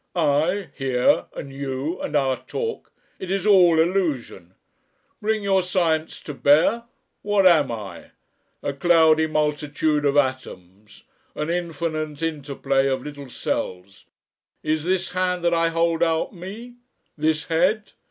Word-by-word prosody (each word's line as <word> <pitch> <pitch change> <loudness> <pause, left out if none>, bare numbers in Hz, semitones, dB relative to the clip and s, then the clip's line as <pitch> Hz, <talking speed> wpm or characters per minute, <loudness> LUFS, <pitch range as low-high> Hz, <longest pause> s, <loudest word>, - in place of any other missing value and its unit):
I, 165 +2 +1
here, 130 -2 +1
and 140 -1 -7
you, 140 +4 -4
and 150 - -4
our 135 -2 +2
talk 455 - -5 0.3
it 190 - -6
is 195 0 -1
all 180 -6 +6
Illusion. 160 - -1 0.7
Bring 215 0 0
your 195 -1 +3
Science 170 -3 -1
to 150 - -7
bear 155 +12 +3 0.4
what 205 -1 +2
am 155 -8 +5
I? 105 -6 -8 0.5
A 140 - -2
cloudy 160 +1 +4
multitude 150 0 0
of 140 0 +2
atoms, 105 -7 -3 0.3
an 150 +2 -2
infinite 160 -3 -3
interplay 140 -3 -1
of 130 -1 -1
little 145 -2 -9
cells. 95 -4 -4 0.6
Is 155 0 -1
this 185 0 0
hand 180 -1 -1
that 170 - +3
I 165 0 +2
hold 165 0 0
out 165 +2 +1
me? 215 +7 -9 0.4
This 155 0 0
head? 185 +6 +1
160 Hz, 135 wpm, -23 LUFS, 140-180 Hz, 0.7 s, all